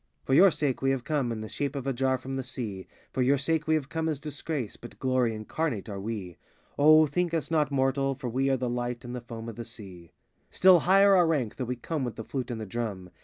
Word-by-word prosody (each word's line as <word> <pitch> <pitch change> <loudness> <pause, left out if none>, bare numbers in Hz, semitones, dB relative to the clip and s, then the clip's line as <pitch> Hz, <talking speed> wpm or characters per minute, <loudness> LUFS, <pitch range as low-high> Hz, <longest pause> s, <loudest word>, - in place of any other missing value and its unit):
87 - - -38
For 130 - 0
your 185 +8 +8
sake 145 -6 -1
we 135 - +2
have 135 -2 0
come 140 -5 -1
In 110 -1 -4
the 110 - -5
shape 140 +5 -3
of 135 -2 -4
a 135 - 0
jar 130 +1 +1
from 130 +1 -7
the 135 - -2
Sea; 115 -7 -5 0.3
For 130 - 0
your 135 +3 +4
sake 155 +2 0
we 160 - +4
have 145 -4 -1
come 160 +2 -2
as 150 -3 -2
Disgrace. 145 -4 -4
But 120 - -12
glory 130 -3 +1
incarnate 110 +1 -3
are 100 -1 -5
we. 100 -5 -5 0.4
O 155 +2 +7
think 170 +3 -1
us 165 0 -2
not 155 -2 +2
mortal, 135 0 +1
for 130 -1 -6
we 130 +3 0
Are 135 - +2
the 125 0 -2
light 120 0 -3
on 120 - -6
the 125 - -5
foam 115 -1 -8
of 115 - -7
the 120 - -4
sea. 95 -8 -11 0.4
Still 185 -1 +6
higher 195 +4 +5
our 175 -2 +5
rank, 140 -9 -1
though 130 - -2
we 125 +1 -2
come 145 +4 -3
With 120 -3 -3
the 115 - -6
flute 130 +1 -4
and 120 -2 -4
the 110 - -5
drum. 100 -4 -5
130 Hz, 265 wpm, -28 LUFS, 115-150 Hz, 0.4 s, your